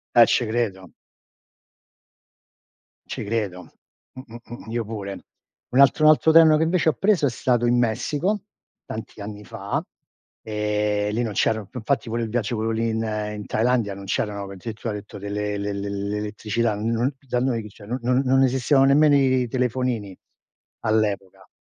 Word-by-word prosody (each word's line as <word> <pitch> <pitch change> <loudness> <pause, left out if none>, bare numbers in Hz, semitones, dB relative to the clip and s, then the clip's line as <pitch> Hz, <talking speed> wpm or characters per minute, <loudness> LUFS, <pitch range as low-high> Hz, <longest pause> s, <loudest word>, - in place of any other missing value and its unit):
Eh, 120 - +9
ce 120 - +2
credo. 105 -6 -2 2.2
Ci - - -4
credo. 100 -4 -3 0.4
Mh-mh-mh 120 -2 -10
io 120 -1 -1
pure. 100 -3 -6 0.5
Un 125 - +1
altro 140 +3 +5
un - - +9
altro 160 +1 +4
treno 160 -1 +7
che 160 - +2
invece 165 0 +2
ho - - +1
preso 195 -7 +2
è - - +1
stato 120 0 0
in 120 0 +3
Messico, 145 - 0 0.4
tanti 110 -1 -7
anni 105 0 -7
fa, - - -4 0.6
ehm, 105 -1 -1
lì 120 - 0
non 110 -3 -3
c'erano 110 +1 +1
f - - -31
infatti 125 0 -1
pure 115 +1 -1
il 110 - -4
viaggio, 115 0 -1
quello 110 +1 -1
lì 115 +1 0
in 110 0 -1
ehm, 105 -1 -3
in - - -9
Thailandia, 115 -2 +1
non 100 0 -9
c'erano 100 +1 -2
addirittura 110 +3 -5
hai 105 - -4
detto 100 - -12
delle 105 0 -3
le 100 0 -3
le 100 0 -4
l'elettricità, 105 +2 -2
n 105 +2 -3 0.2
n 135 +2 0
dai 125 0 0
noi 120 -4 0
chi, 105 - -9
c'è, 100 +1 -15
non 125 +4 -3
non 125 +2 +2
non 135 +1 +4
esistevano 135 +2 +3
nemmeno 145 +1 +5
i 130 -2 +3
telefonini, 125 -5 -2 0.6
all'epoca. 105 -3 -1
115 Hz, 170 wpm, -23 LUFS, 105-125 Hz, 2.2 s, Eh